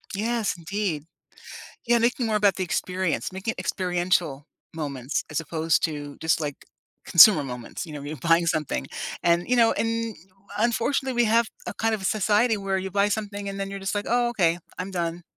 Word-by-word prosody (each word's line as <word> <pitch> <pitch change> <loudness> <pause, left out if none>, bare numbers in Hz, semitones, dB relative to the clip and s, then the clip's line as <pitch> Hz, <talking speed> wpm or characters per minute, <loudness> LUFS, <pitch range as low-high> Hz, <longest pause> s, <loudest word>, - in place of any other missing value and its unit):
Yes, 225 0 -1
indeed. 170 -2 -3 0.8
Yeah, 240 0 +4
making 235 +1 +1
more 215 -1 +1
about 205 -2 +3
the 185 - -1
experience. 180 +1 -2
Make 190 +4 -7
it - - -1
experiential 175 -5 0 0.3
moments 140 -4 -3
as 155 - -1
opposed 160 +1 0
to 145 -2 -4
just, 160 0 +1
like, 145 -2 -5 0.4
consumer 170 -2 +8
moments, 125 +6 -6
you 155 - -9
know, 150 - -6
when 145 - -7
you're 155 - -5
buying 165 +5 +3
something. 150 - -1 0.4
And, 170 +3 +2
you 250 - +3
know, 230 -1 +5
and, 230 -1 -1 0.4
unfortunately, 240 +4 +1
we - - +3
have 230 +2 +3 0.2
a - - -4
kind 225 0 0
of 210 - -5
a - - -7
society 215 +3 +2
where 195 -1 -1
you 190 0 -4
buy 200 +2 +2
something, 205 -1 -3
and 195 0 -5
then 195 0 -3
you're 200 - -5
just 195 +1 -3
like, 205 0 -2
"Oh, 240 0 +2
okay. 175 -7 +2 0.2
I'm 185 +2 -4
done." 170 -2 -3
190 Hz, 195 wpm, -25 LUFS, 165-215 Hz, 0.8 s, consumer